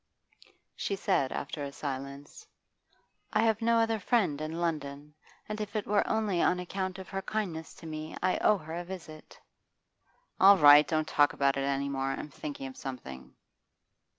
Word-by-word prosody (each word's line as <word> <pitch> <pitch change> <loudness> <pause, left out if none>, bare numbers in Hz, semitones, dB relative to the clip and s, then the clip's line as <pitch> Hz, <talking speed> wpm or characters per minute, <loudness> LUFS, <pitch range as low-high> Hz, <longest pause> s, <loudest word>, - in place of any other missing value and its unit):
She 200 - -2
said 135 -8 0
after 145 +1 -4
a 140 - -5
silence: 140 - -7 0.9
'I - - +3
have 220 -1 +2
no 230 0 +3
other 225 -1 +2
friend 185 - +1
in 155 +1 -4
London; 150 -3 -3 0.3
and 215 0 -4
if 210 +1 -6
it 210 - -1
were 205 0 +2
only 210 -6 +1
on 180 - +2
account 185 +1 -4
of 190 - -9
her 195 -1 -3
kindness 190 -6 -4
to - - -13
me, 155 0 -6
I 185 - +1
owe 210 - +4
her 160 -2 -9
a 175 +1 -3
visit.' 170 -4 -10 1.0
'All 195 +1 +8
right, 145 -2 +8
don't 155 -1 0
talk 145 -2 +3
about 140 0 +2
it 135 0 -1
any 140 0 -1
more; 135 -1 -2
I'm 150 - -6
thinking 145 -1 -7
of 130 -1 -8
something. 65 - -8
160 Hz, 175 wpm, -30 LUFS, 140-195 Hz, 1.0 s, All